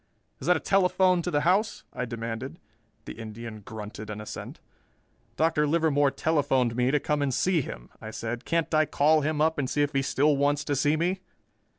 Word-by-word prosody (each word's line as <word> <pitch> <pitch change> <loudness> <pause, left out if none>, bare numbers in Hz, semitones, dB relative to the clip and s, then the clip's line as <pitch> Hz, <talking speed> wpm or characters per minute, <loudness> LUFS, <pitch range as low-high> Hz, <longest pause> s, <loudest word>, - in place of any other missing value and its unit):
"Is - - -7
that 180 -1 +5
a - - -4
telephone 185 -1 +3
to 180 - -3
the 145 -4 +1
house?" 195 +6 +1
I 125 - -3
demanded. 115 +4 -5 0.5
The - - -6
Indian 110 0 -7
grunted 105 0 -8
an 105 0 -5
assent. 105 - -8 0.8
"Dr. 155 -2 +2
Livermore 145 -3 +3
telephoned 135 -6 +1
me 125 +1 +2
to 150 +2 +2
come 150 +1 -1
and 140 -1 +1
see 175 +5 +2
him," - - -8
I 110 - -7
said. 115 +3 -5
"Can't 165 -1 -1
I 155 0 +4
call 155 +2 +3
him 150 +1 -1
up 160 0 +2
and 130 -3 -1
see 145 +1 +1
if 145 - -2
he 135 - +2
still 145 +2 +2
wants 145 +1 +1
to 145 - -1
see 145 +3 +2
me?" 180 +4 0
145 Hz, 200 wpm, -27 LUFS, 120-160 Hz, 0.8 s, that